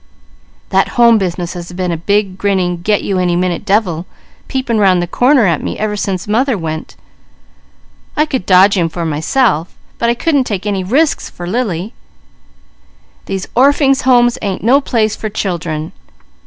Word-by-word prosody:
"That - - +2
Home 235 -2 +6
business 175 -2 -3
has 175 -1 -8
been 180 0 -2
a - - -1
big, 195 +3 0
grinning, 185 -3 -1
'Get 205 +3 +1
you 195 -2 -1
any 180 -1 +1
minute 180 0 -1
devil,' 195 -5 0 0.4
peeping 255 -4 -1
'round 190 -3 +4
the 175 - 0
corner 250 - +3
at 170 -5 +1
me - - -4
ever 210 -1 -2
since 195 -2 -3
mother 240 +3 +1
went. 160 -2 -5 1.2
I 300 - +3
could 260 -11 -4
dodge 190 +2 +5
him 170 -3 +1
for 170 +1 -4
myself, 160 - 0 0.2
but 235 - +1
I 235 - +2
couldn't 285 0 +1
take 200 -4 -4
any 200 -2 -1
risks 285 - +1
for 175 - -9
Lily. 200 -1 -2 1.3
These 195 -1 -4
Orphings' 275 +1 +3
Homes 240 -2 +3
ain't 195 -3 -3
no 265 +6 +4
place 220 -5 0
for 215 - -5
children. 170 -6 -3
200 Hz, 165 wpm, -15 LUFS, 175-235 Hz, 1.3 s, Home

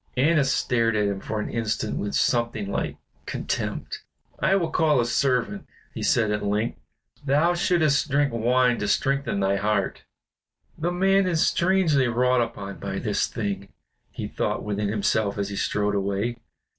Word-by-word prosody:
Annas 140 0 +3
stared 115 -4 +1
at 105 -1 +2
him 100 -1 -2
for 110 +2 -4
an 105 - -3
instant 110 -2 -2
with 100 0 -3
something 115 -4 0
like - - -2 0.3
contempt. - - -3 0.4
"I 195 - +3
will 170 -5 0
call 155 -4 +3
a 120 - +2
servant," 125 -4 0 0.3
he - - -6
said 110 -3 +2
at 105 0 -1
length. 105 +3 -1 0.4
"Thou 150 +5 +3
shouldst 160 -4 +2
drink 140 -2 +2
wine 120 +1 +2
to 105 - -2
strengthen 135 -1 0
thy 95 +1 +2
heart." 105 +2 -1 0.7
"The 165 +2 -2
man 195 +2 +3
is 165 -3 +2
strangely 170 -7 +2
wrought 125 +1 +2
upon 100 -4 -5
by - - -4
this - - 0
thing," 100 -1 -4 0.4
he - - -6
thought - - -2
within 105 0 -2
himself 105 0 0
as 100 0 -2
he 100 - -5
strode 105 +1 0
away. 100 +4 -1
120 Hz, 160 wpm, -25 LUFS, 105-145 Hz, 0.7 s, Annas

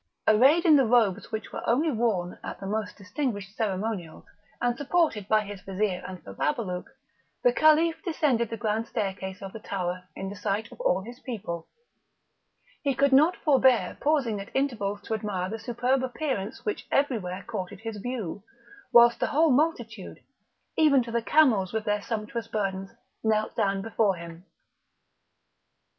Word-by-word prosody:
Arrayed 265 +10 +5
in 310 -3 +7
the 270 - +4
robes 225 -4 +2
which 220 -1 -4
were - - -4
only 295 +7 +3
worn 215 -7 -1
at - - -6
the 195 - -7
most 210 +1 -3
distinguished 205 -1 -4
ceremonials, 200 -5 -3 0.3
and 240 0 +1
supported 285 - +1
by 215 0 +4
his 205 -2 -8
Vizir 195 -1 -2
and 185 -1 -9
Bababalouk, 180 - -2 0.6
the - - +5
Caliph 315 +1 +4
descended 280 - +1
the 230 - -4
grand 220 +1 -1
staircase 190 0 -4
of 195 - -7
the 225 - -7
tower 180 -3 -3
in 195 - -5
the 200 - -7
sight 205 +3 -2
of - - -10
all - - +1
his 240 +4 -10
people; 205 -11 -5 1.1
he 280 -3 0
could 280 0 +3
not 310 +7 +5
forbear 265 -4 +4
pausing 275 -9 +1
at 200 - -10
intervals 210 -7 -1
to - - -4
admire 200 -4 -2
the 225 - -4
superb 250 +3 0
appearance 250 -5 -3
which 420 -2 -3
everywhere 200 -10 0
courted 200 -3 -5
his 225 -2 -5
view, 210 -4 -4 0.5
whilst 235 0 +7
the - - +1
whole 310 +1 +3
multitude, 240 - -1 0.6
even 285 -5 +5
to 230 - -7
the 235 0 0
camels 225 -9 +3
with 220 -1 -2
their 210 0 0
sumptuous 225 +1 -4
burdens, 195 -3 -2 0.3
knelt 215 -1 +1
down 195 0 0
before 220 -3 +1
him. 170 +1 -10
220 Hz, 160 wpm, -27 LUFS, 195-260 Hz, 1.1 s, in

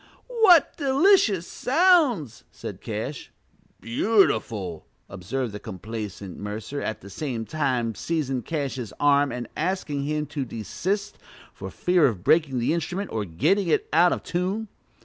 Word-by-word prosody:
"What 440 - +5
delicious 275 - +3
sounds!" 270 - +2
said - - -8
Cash. 115 +6 -5 0.5
"Beautiful!" 110 - +1 0.2
observed 105 +7 -4
the 105 - -7
complacent 100 -1 -7
Mercer, 105 +7 -5
at 110 - -4
the 100 - -11
same 120 -1 -4
time 125 -5 -1
seizing 135 -1 -2
Cash's 130 -5 -4
arm 145 -1 +4
and 125 -1 -5
asking 170 -7 -2
him 150 +1 -1
to 145 -1 -4
desist, 190 - -3 0.3
for - - -7
fear 180 -2 +3
of 100 -8 -3
breaking 155 -3 +3
the 120 +5 +1
instrument 175 +4 -3
or 110 -2 -2
getting 175 - +1
it 160 - +1
out 175 +3 +5
of - - -2
tune. 190 +5 -2
145 Hz, 135 wpm, -25 LUFS, 115-190 Hz, 0.5 s, What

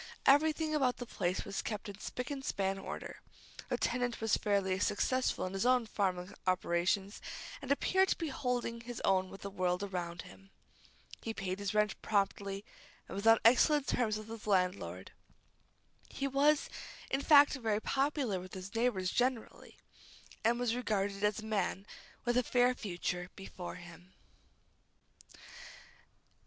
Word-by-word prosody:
Everything 310 +2 +4
about 265 -5 +2
the 245 - -5
place 185 -5 -2
was 200 -1 -3
kept 210 -1 -4
in 200 0 -8
spick 250 +4 -5
and 275 -1 -4
span 195 -5 -1
order. - - -7 0.5
The - - 0
tenant 245 -1 -1
was 225 -1 +2
fairly 195 -2 +1
successful 255 +6 +1
in 185 - -5
his 195 +5 0 0.2
farming 185 -2 -1
operations, 185 +2 +1 0.4
and 275 - -4
appeared 380 +6 +3
to - - +1
be 325 -3 -3
holding 250 -3 -2
his 240 0 -7
own 190 -1 +2
with 195 - -11
the 200 - -6
world 180 0 0
around 175 -3 -4
him. 195 +2 -15 0.7
He 225 -1 -4
paid 190 0 -3
his 200 +1 -3
rent 210 -1 +1
promptly, 200 -1 -1 0.4
and - - -8
was 200 +3 -1
on 225 0 +8
excellent 270 +5 +5
terms 220 -4 +1
with 215 0 -8
his 225 -1 -8
landlord. 180 - 0 1.0
He 275 - -2
was, 285 +2 +3 0.4
in 270 - +1
fact, 290 -1 +7
rather 220 -4 0
popular 270 -5 0
with 185 +1 -9
his 190 +2 -7
neighbors 225 -6 +1
generally, 250 -2 -2 0.7
and 235 +2 +3
was 245 -2 +1
regarded 205 -4 -1
as 210 +1 +1
a - - -9
man 200 -2 -1 0.4
with 240 0 +2
a - - +5
fair 245 +1 +3
future 180 -5 -3
before 190 -2 -7
him. 175 +1 -13
210 Hz, 150 wpm, -33 LUFS, 190-250 Hz, 1.0 s, on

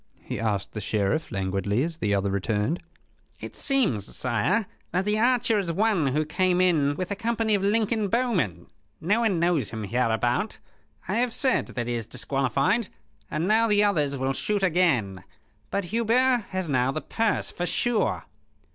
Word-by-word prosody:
he - - -5
asked 105 -3 -1
the 105 - -4
Sheriff, 105 +9 -1
languidly, 100 +4 -1
as 165 0 -3
the 105 -9 -1
other 100 -1 +1
returned. 105 - -1 0.6
"It - - -8
seems, 220 - 0
sire, 130 - +1 0.3
that 185 +2 0
the 210 +1 +1
archer 235 -2 +3
is 180 -4 -1
one 195 -4 +2
who 150 +4 0
came 180 +3 +1
in 155 -6 +3
with 185 +5 -4
a - - 0
company 225 0 0
of 200 - +2
Lincoln 215 +1 +1
bowmen. 180 - 0 0.3
No 205 +8 +1
one 215 -7 +1
knows 165 - +1
him 110 -1 -5
hereabout. 120 - 0 0.5
I - - -1
have 240 0 0
said 260 -2 +1
that 120 - -4
he 120 - -1
is 115 -3 -3
disqualified, 140 - 0 0.4
and 160 +4 -1
now 225 +2 +4
the 210 -1 +3
others 150 -9 +1
will 135 +1 -1
shoot 205 +7 -1
again. 140 - +1 0.5
But 200 -2 -1
Hubert 235 +1 +2
has 185 -2 -2
now 130 -2 +1
the 155 - -3
purse, 225 -2 -1
for 175 - -3
sure." 240 +2 0
170 Hz, 170 wpm, -26 LUFS, -, 0.6 s, now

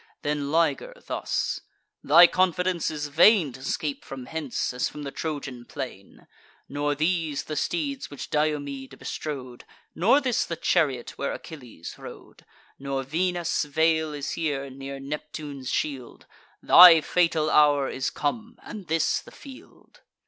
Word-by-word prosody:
Then 145 -1 -2
Liger 170 - +1
thus: - - -2 0.4
"Thy 175 - +8
confidence 180 -1 +1
is 150 -1 -4
vain 165 - +5
To 130 +2 -12
scape 145 +1 -3
from 130 -2 -8
hence, 150 -5 -3
as 125 - -1
from 150 - -9
the 140 - -5
Trojan 140 -6 -5
plain: - - -9 0.4
Nor 145 +1 -1
these 155 -1 -1
the 155 - -6
steeds 285 - -2
which 145 - -8
Diomede 145 -3 -2
bestrode, 130 -5 -6 0.3
Nor 230 +10 +4
this 250 -4 0
the 165 - -4
chariot 135 -7 0
where 140 - -2
Achilles 125 - -10
rode; - - -12 0.3
Nor 135 -1 -3
Venus' 175 +3 -1
veil 160 +1 +1
is 145 -1 -5
here, 140 -4 -3
near 135 +1 -8
Neptune's 145 -1 -6
shield; 135 -5 -4 0.4
Thy 170 -2 +9
fatal 165 -2 +1
hour 145 -2 +4
is 130 - -2
come, 220 +10 -4
and 205 -5 -9
this 165 +1 +1
the - - -15
field." 275 - -15
150 Hz, 140 wpm, -25 LUFS, 140-170 Hz, 0.4 s, Thy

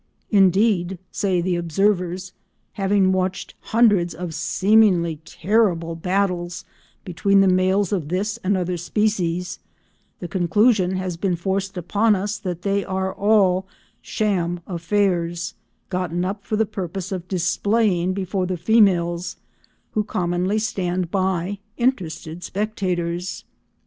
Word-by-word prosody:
"Indeed," 190 -2 +3
say 185 -3 0
the 180 0 0
observers, 180 +1 0 0.4
"having 195 -1 +2
watched 185 0 -2
hundreds 205 -7 +2
of 175 -2 -5
seemingly 175 0 +3
terrible 175 -3 +1
battles 180 0 -1 0.4
between 195 +2 +2
the 195 - +4
males 185 +1 +2
of 175 -7 -1
this 200 +4 -1
and 195 +1 0
other 180 -1 -1
species, 180 -2 -1 0.6
the 175 - -5
conclusion 190 +2 +2
has 185 -2 -3
been 180 0 0
forced 190 +2 -2
upon 205 +5 +2
us 200 +1 -3
that 180 -4 -5
they 200 0 +1
are 190 0 -2
all 195 -3 +3 0.3
sham 175 -5 -1
affairs, 175 -1 -1 0.4
gotten 180 -1 -1
up 200 +2 -4
for 215 - -1
the 220 +1 +2
purpose 190 -2 -5
of 180 -2 -4
displaying 185 +1 +1
before 185 -1 -2
the 185 -1 -2
females, 175 -3 +2 0.5
who 215 - 0
commonly 180 +1 -1
stand 180 -5 -1
by, 190 0 -1 0.2
interested 175 -9 -2
spectators." 180 -3 -2
185 Hz, 120 wpm, -22 LUFS, 175-200 Hz, 0.6 s, the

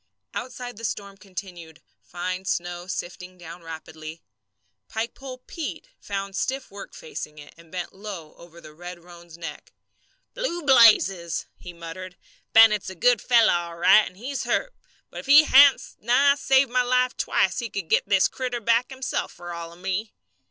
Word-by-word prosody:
Outside 245 -2 -6
the 230 - -11
storm 200 -3 -4
continued, 180 -5 -10 0.2
fine 185 +1 -5
snow 175 -1 -3
sifting 180 -1 -6
down 170 0 -11
rapidly. 160 0 -9 0.7
"Pikepole 255 +3 -6
Pete" 335 +9 -6
found 195 -1 -5
stiff 265 +4 -3
work 200 0 -10
facing 445 - -8
it, 145 -1 -12
and 165 -1 -19
bent 180 -1 -5
low 190 -6 -8
over 170 0 -15
the 155 -2 -13
red 175 +1 -10
roan's 170 -1 -14
neck. 165 -3 -8 0.6
"Blue 345 -10 -3
blazes!" 210 - +5
he 180 - -10
muttered. 175 +2 -9 0.3
"Bennett's 215 -3 +6
a 190 - -9
good 245 +7 +3
fellow 235 -3 +4
all 170 -1 -3
right, 210 +5 +6
and 180 - -13
he's 265 +6 -4
hurt; - - -1 0.4
but - - -7
if - - -9
he 290 +2 +9
hadn't 280 -2 +5
nigh 270 +5 +4
saved 270 -2 +2
my 250 0 +3
life 250 0 +1
twice 190 - +1
he 235 - -4
could 195 -4 -5
get 200 - +1
this 195 -2 +4
critter 250 -2 -4
back 230 +2 +2
himself 265 -1 -3
fer 175 0 -8
all 170 0 -7
of 170 - -15
me!" 195 +4 -3
195 Hz, 165 wpm, -24 LUFS, 175-245 Hz, 0.7 s, he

